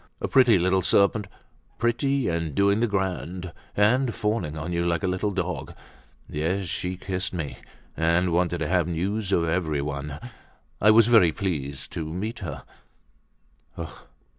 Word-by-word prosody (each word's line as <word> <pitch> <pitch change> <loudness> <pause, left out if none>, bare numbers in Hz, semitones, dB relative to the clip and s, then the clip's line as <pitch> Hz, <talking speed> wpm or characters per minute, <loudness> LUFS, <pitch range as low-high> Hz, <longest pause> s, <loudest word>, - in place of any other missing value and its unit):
A - - -2
pretty 125 -6 +5
little 95 +2 +2
serpent, 100 +3 +3 0.5
pretty, 130 +3 +1
and 85 -3 -2
doing 100 +4 +3
the 120 - +2
grand, 95 -3 -3 0.2
and 120 +4 +3
fawning 105 -8 -1
on 85 +3 -4
you 85 0 0
like 85 -1 0
a - - +1
little 90 +3 0
dog. 90 -3 -3 0.5
Yes, 85 +6 -1
she 90 +2 -3
kissed 95 +1 -3
me, 80 -5 -4 0.4
and 85 +2 +2
wanted 85 0 +1
to 80 - 0
have 90 -1 +2
news 95 +4 -2
of 85 -3 +2
everyone—I 75 - -3
was 110 +1 +7
very 110 -8 +6
pleased 75 -8 -3
to 80 -1 -4
meet 105 +7 -4
her." 75 -8 -6
90 Hz, 140 wpm, -25 LUFS, 85-105 Hz, 0.5 s, was